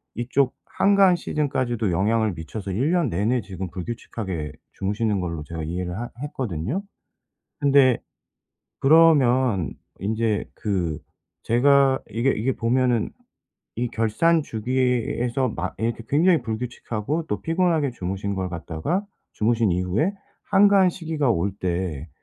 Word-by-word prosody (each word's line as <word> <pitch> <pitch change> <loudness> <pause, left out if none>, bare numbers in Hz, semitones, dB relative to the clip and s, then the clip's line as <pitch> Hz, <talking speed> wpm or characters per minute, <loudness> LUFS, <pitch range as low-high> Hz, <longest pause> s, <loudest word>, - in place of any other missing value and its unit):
이쪽 125 +3 0 0.2
한가한 195 -2 +5
시즌까지도 125 - -1
영향을 105 +4 +1
미쳐서 95 +5 -6
1 130 - +1
년 175 -6 +2
내내 110 +7 +1
지금 95 -2 -6
불규칙하게 90 -5 -5 0.2
주무시는 105 +1 -1
걸로 85 -4 -4
제가 80 +1 -6
이해를 90 +2 -3
하 120 - -4
했거든요. 130 - -3 0.8
근데 140 -4 +5 0.8
그러면 130 - +4 0.3
인제 110 +1 0
그 90 -8 -2 0.4
제가 135 +3 +4
이게 115 +5 +1
이게 120 +5 0
보면은 120 -1 +1 0.7
이 120 +2 -1
결산 155 +10 +2
주기에서 125 +1 0
막 90 -2 -4
이렇게 115 +2 -2
굉장히 160 +1 +4
불규칙하고 120 +5 -3
또 105 - -2
피곤하게 165 -4 +1
주무신 95 -1 -3
걸 95 -1 -2
갖다가 85 - -3 0.3
주무신 115 -1 +1
이후에 90 - 0 0.4
한가한 200 -2 +5
시기가 160 -6 -1
올 100 -1 0
때 85 -4 -2
115 Hz, 280 characters per minute, -24 LUFS, 95-140 Hz, 0.8 s, 한가한